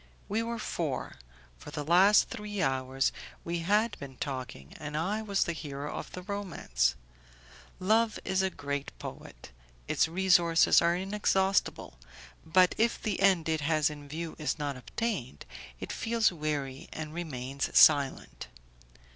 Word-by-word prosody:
We 215 +3 0
were 230 0 -3
four; 165 -9 -3 0.4
for - - -10
the 150 0 -4
last 185 +7 +5
three 210 -4 -5
hours 135 -2 0 0.3
we 170 0 -2
had 210 +6 +2
been 135 -2 -9
talking, 130 - -6
and 150 -1 -5
I 200 +7 -1
was 200 -3 +1
the 170 - -2
hero 145 -2 -6
of - - -6
the 180 - -7
romance. 170 - -1 0.8
Love 220 +4 +2
is 190 0 +1
a 190 - +1
great 145 -4 -5
poet, - - -10 0.4
its - - +2
resources 175 -1 +4
are 170 0 +3
inexhaustible, 195 - 0 0.4
but 180 +3 +4
if 230 +1 +2
the 215 -4 -2
end 190 -4 +3
it 160 -1 0
has 155 0 +2
in 145 -1 -10
view 160 +2 -5
is 155 - -1
not 145 -2 -3
obtained, 130 - -4 0.3
it - - -6
feels 225 -2 +1
weary 150 -4 -4
and 155 -1 -6
remains 140 -5 -4
silent. 140 - +4
165 Hz, 145 wpm, -30 LUFS, 145-195 Hz, 0.8 s, last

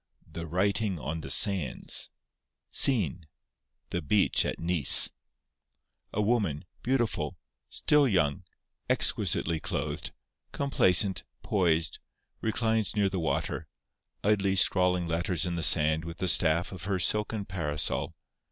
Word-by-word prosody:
The 85 0 -8
Writing 100 +3 -1
on 80 +3 -5
the 70 - -9
Sands 85 - 0 0.6
SCENE—The 85 - -1
Beach 95 +7 +1
at - - -4
Nice. 85 -4 +7 1.0
A - - -4
woman, 100 -10 -1 0.2
beautiful, 120 - -2 0.3
still 150 -2 +2
young, 85 - 0 0.5
exquisitely 80 -1 +1
clothed, - - -5 0.4
complacent, 95 -8 +1 0.2
poised, 85 -5 0 0.4
reclines 110 -1 -1
near 100 -2 +1
the 95 - -4
water, 80 - -3 0.6
idly 100 -2 +1
scrawling 90 -1 +2
letters 85 +2 -1
in 90 - -3
the 85 - -3
sand 80 -1 +2
with 85 +1 -8
the 95 - -3
staff 85 +1 +2
of 95 -2 -9
her 100 -1 -1
silken 105 +2 0
parasol. 75 -6 -2
90 Hz, 115 wpm, -28 LUFS, 80-105 Hz, 1.0 s, Nice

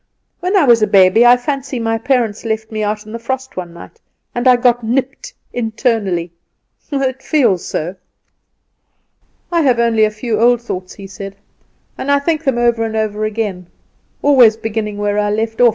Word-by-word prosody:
"When 365 +3 0
I 370 - +4
was 235 -4 +5
a 215 - +3
baby, 195 +4 +5
I 245 +1 +7
fancy 270 +1 -4
my 225 -1 -1
parents 235 -4 0
left 220 -1 -3
me 215 -1 -3
out 210 0 -2
in 215 - -11
the 230 - -6
frost 260 +3 -5
one 175 -2 -6
night, 170 - -14 0.3
and 240 +2 -1
I 250 - +7
got 245 -1 +2
nipped 270 - -2 0.2
internally 220 -7 -1 0.6
it 265 -2 -1
feels 245 - +1
so!" 175 +5 -4 1.6
"I 340 -1 +2
have 260 -5 +3
only 230 -2 +2
a 215 - +4
few 215 0 -3
old 240 +1 +4
thoughts," 185 -6 -6
he 200 - -10
said, 195 +1 -8 0.6
"and 275 - -4
I 285 - +5
think 310 +2 -1
them 270 -5 0
over 235 -1 +2
and 220 -1 -3
over 215 -1 -1
again; 205 -5 -3 0.6
always 250 -6 +5
beginning 215 -2 -4
where 205 0 0
I 205 0 0
left 225 +2 -2
off. 245 - +7
225 Hz, 185 wpm, -16 LUFS, 210-255 Hz, 1.6 s, I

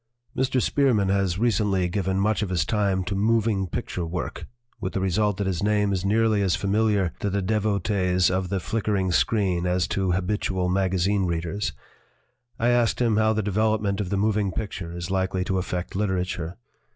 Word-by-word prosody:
Mr. 130 0 +1
Spearman 120 -7 +2
has 95 -2 +1
recently 105 -5 +1
given 95 0 -1
much 105 +1 +1
of 105 - -1
his 85 -5 0
time 100 -2 +1
to 90 +3 -3
moving 105 -1 +1
picture 90 0 -4
work, 85 +2 -5 0.3
with 95 - -4
the - - -1
result 100 +2 +1
that 100 - -1
his 95 -3 -1
name 105 -1 +2
is 95 -1 -1
nearly 110 +1 +2
as 95 -3 +2
familiar 100 -2 +1
to 100 - -1
the 100 +1 -1
devotees 100 -3 +1
of 95 0 -1
the 100 - -1
flickering 100 -2 -1
screen 90 -3 +1
as 90 -1 +1
to 95 -2 0
habitual 95 -1 -1
magazine 95 +1 +1
readers. 85 +4 -2 0.8
I 120 - +2
asked 120 -2 +2
him 115 -4 +2
how 110 0 +3
the 110 0 -1
development 105 0 0
of 95 - -4
the 100 - 0
moving 105 -1 +1
picture 95 -5 -5
is 85 +1 -5
likely 95 -1 0
to 95 0 -1
affect 90 -1 -4
literature. 90 -3 -2
100 Hz, 175 wpm, -25 LUFS, 90-105 Hz, 0.8 s, how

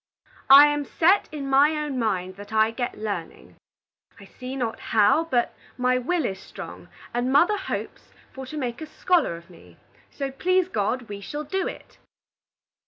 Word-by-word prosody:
"I 280 +2 +11
am 295 0 0
set 360 +7 +2
in 290 -3 -5
my 280 +3 +4
own 295 -4 -3
mind 190 -5 -1
that 205 +1 -11
I 220 0 +3
get 245 +1 -4
learning. 175 - -6 0.6
I 200 - -13
see 255 +6 -8
not 235 -4 -3
how, 220 +9 +3
but 250 -7 0 0.2
my 250 0 +2
will 325 +4 -1
is 190 -3 -3
strong, - - -10 0.3
and 245 +2 0
mother 345 +10 +4
hopes - - -6 0.2
for 265 -1 -8
to 305 - -7
make 245 -3 -4
a 315 - -6
scholar 330 - +1
of 170 +2 -16
me. 175 - -17 0.3
So, 275 -1 -5
please 370 +6 +1
God, 235 - -1
we 205 -3 -8
shall 295 +9 -5
do 380 +6 -2
it." - - -10
255 Hz, 170 wpm, -24 LUFS, 220-300 Hz, 0.6 s, I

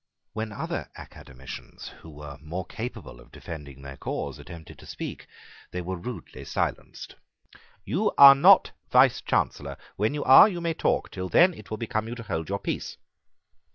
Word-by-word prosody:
When 110 0 -4
other 105 - -5
academicians 65 +1 -11
who 80 - -13
were 75 -2 -10
more 85 +4 -5
capable 110 - -8
of - - -18
defending 70 -4 -10
their 70 0 -9
cause - - -5
attempted 85 -2 -12
to - - -14
speak - - -7 0.4
they 90 - -5
were 95 +2 -4
rudely 115 +7 -8
silenced. - - -4 0.7
"You 205 +7 0
are 140 -1 +11
not 135 - +6 0.2
Vicechancellor. - - +2 0.2
When 110 +8 0
you 145 - -3
are, 135 +10 +8
you 175 -4 -5
may 170 -1 -1
talk. - - -1
Till 95 -1 -5
then 180 - +5
it - - -13
will 110 - -4
become 110 0 -3
you 120 - -5
to 115 - -8
hold 80 -5 -4
your 100 - -1
peace." - - -5
100 Hz, 165 wpm, -26 LUFS, 80-125 Hz, 0.7 s, are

